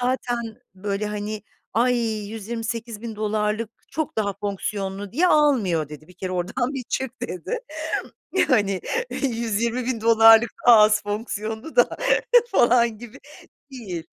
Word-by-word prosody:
zaten 250 -1 0 0.4
böyle, 200 +2 -3
hani, 210 0 -4 0.3
ay, 245 +3 +3 0.3
$128.000 220 -1 -3 0.2
çok 310 +1 -3
daha 205 -2 0
fonksiyonlu 200 0 -4
diye 345 +8 +3
almıyor." 225 - +3
dedi. 150 +1 -11
"Bir 180 - -16
kere 185 0 -5
oradan 185 +9 -2
bir 255 -3 -4
çık." 260 -1 -3
dedi. 185 - -4 0.7
Yani, 215 - +2 0.3
"$120.000 230 -1 +3 0.2
daha 240 -2 +9
az 210 0 +5
fonksiyonlu 220 - -5
da - - +6 0.6
falan 235 - +3
gibi 235 -2 -11 0.5
değil." 195 -11 -6
220 Hz, 110 wpm, -23 LUFS, 205-240 Hz, 0.7 s, daha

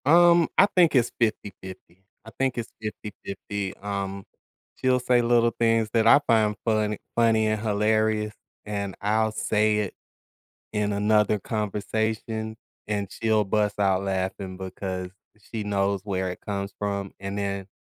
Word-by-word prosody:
Um, 170 +2 +6
I 195 - +8
think 175 -5 +5
it's 120 -2 +3
50/50, 95 -4 -4 0.2
I 110 - -10
think 135 -2 +1
it's 115 -2 -4
50/50, 100 -2 -5
um, 100 -1 -4 0.5
she'll 130 0 +2
say 125 0 +3
little 120 0 +3
things 115 -1 +3
that 115 -1 +3
I 130 - +8
find 110 -2 +3
funny 110 -2 +1 0.2
funny 115 -2 +3
and 110 -1 0
hilarious, 110 0 +1 0.3
and 100 -2 -3
I'll 110 +2 +2
say 105 0 +1
it 105 -2 -2 0.8
in 105 -1 0
another 105 +1 +3
conversation, 110 +2 -2 0.3
and 100 -2 -2
she'll 110 -2 +1
bust 105 +1 0
out 95 -1 +2
laughing 95 0 -3
because 95 -1 -5 0.4
she 110 -2 -3
knows 100 -1 0
where 95 -2 -2
it 90 - -9
comes 100 -1 -4
from, 100 -1 -3
and 100 +1 -5
then 100 -1 -3
105 Hz, 140 wpm, -25 LUFS, 100-110 Hz, 0.8 s, I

